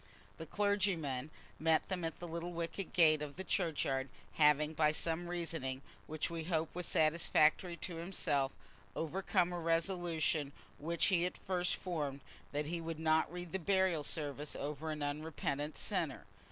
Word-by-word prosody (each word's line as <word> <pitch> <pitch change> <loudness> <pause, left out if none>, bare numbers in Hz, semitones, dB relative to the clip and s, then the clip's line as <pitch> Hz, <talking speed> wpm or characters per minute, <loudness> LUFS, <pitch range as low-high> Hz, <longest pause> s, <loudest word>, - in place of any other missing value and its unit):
The 160 - -6
clergyman 190 -10 0 0.3
met 160 0 +3
them 185 -2 -2
at 165 -1 -3
the 175 - -5
little 170 +1 -4
wicket 170 +3 -3
gate 155 -3 +5
of 145 -1 -5
the 190 - -4
churchyard, 145 -8 0 0.2
having, 150 0 +4
by 150 -1 +4
some 165 +2 -2
reasoning, 160 -7 -3 0.2
which 155 0 -1
we 165 -1 -4
hope 160 -2 0
was 180 -1 -4
satisfactory 160 +2 +3
to 175 -2 -4
himself, 155 -6 0 0.4
overcome 180 +2 0
a 175 - -2
resolution 165 -3 0 0.3
which 165 +3 +1
he 175 -1 +4
at - - -7
first 180 -1 0
formed, 145 -6 -3 0.3
that 150 +1 -1
he 170 +2 -3
would 165 -1 -5
not 160 0 +3
read 175 -1 -6
the 190 - -1
burial 190 -2 +2
service 145 -1 0
over 150 +2 -4
an 150 -1 -3
unrepentant 145 0 -2
sinner. - - -2
160 Hz, 155 wpm, -35 LUFS, 150-175 Hz, 0.4 s, gate